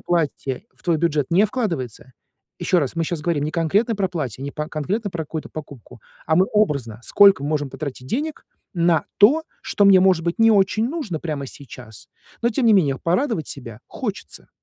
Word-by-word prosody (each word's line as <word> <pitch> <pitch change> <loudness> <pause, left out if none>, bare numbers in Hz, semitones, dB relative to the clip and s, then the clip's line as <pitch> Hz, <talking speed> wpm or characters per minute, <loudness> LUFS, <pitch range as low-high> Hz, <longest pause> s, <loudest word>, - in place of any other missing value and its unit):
платье 150 -5 -2
в - - -24
твой 170 -2 +2
бюджет 150 -3 0
не 190 +5 +4
вкладывается 165 - -3 0.5
ещё 180 - +2
раз, 140 -3 -1
мы 165 - -1
щас 170 -1 -3
говорим 150 -2 -1
не 155 - -2
конкретно 200 +8 +1
про 195 -1 +1
платье, 135 - -5
не 140 - -4
по 150 0 -4
конкретно 200 +8 -3
про 165 -3 -4
какую-то 160 +1 -6
покупку, 135 -6 -10 0.3
а 160 +1 +2
мы 185 - +4
образно, 140 - 0
сколько 195 -7 +5
можем 145 -1 -1
потратить 130 -4 -7
денег 300 - -3 0.3
на 170 -1 +2
то, 275 +11 +6 0.2
что 205 - +1
мне, 195 -1 +7
может 185 -3 +3
быть, 170 - -2
не 225 0 +6
очень 210 +3 +2
нужно 260 - -4
прямо 150 -4 -4
сейчас, 125 -5 -12 0.3
но 235 - +3
тем 240 +2 0
не 225 - +6
менее 145 -10 +3
порадовать 180 - 0
себя 120 -4 -8
хочется. 210 -6 -6
165 Hz, 190 wpm, -22 LUFS, 145-205 Hz, 0.5 s, мне